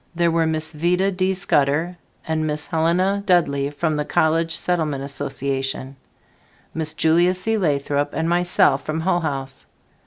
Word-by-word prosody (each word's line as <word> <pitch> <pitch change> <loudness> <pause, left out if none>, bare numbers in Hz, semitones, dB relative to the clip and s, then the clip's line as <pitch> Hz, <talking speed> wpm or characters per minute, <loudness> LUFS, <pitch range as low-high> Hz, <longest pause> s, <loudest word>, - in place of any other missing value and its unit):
There 170 0 +2
were 165 -1 +1
Miss 155 0 -2
Vida 180 +5 +1
D. 185 0 0
Scudder 160 0 +1 0.3
and 155 -1 -1
Miss 150 0 -1
Helena 180 +5 +1
Dudley 140 -7 +2
from 155 +1 -2
the 150 - 0
College 165 +2 +1
Settlement 155 -6 -1
Association, 135 -1 -3 0.8
Miss 160 -1 -3
Julia 170 +4 +3
C. 220 +5 -1
Lathrop 145 -5 0
and 160 - -1
myself 175 -5 +2
from 155 +1 -3
Hull 175 +1 +1
House. 135 -5 -4
160 Hz, 145 wpm, -21 LUFS, 145-175 Hz, 0.8 s, Julia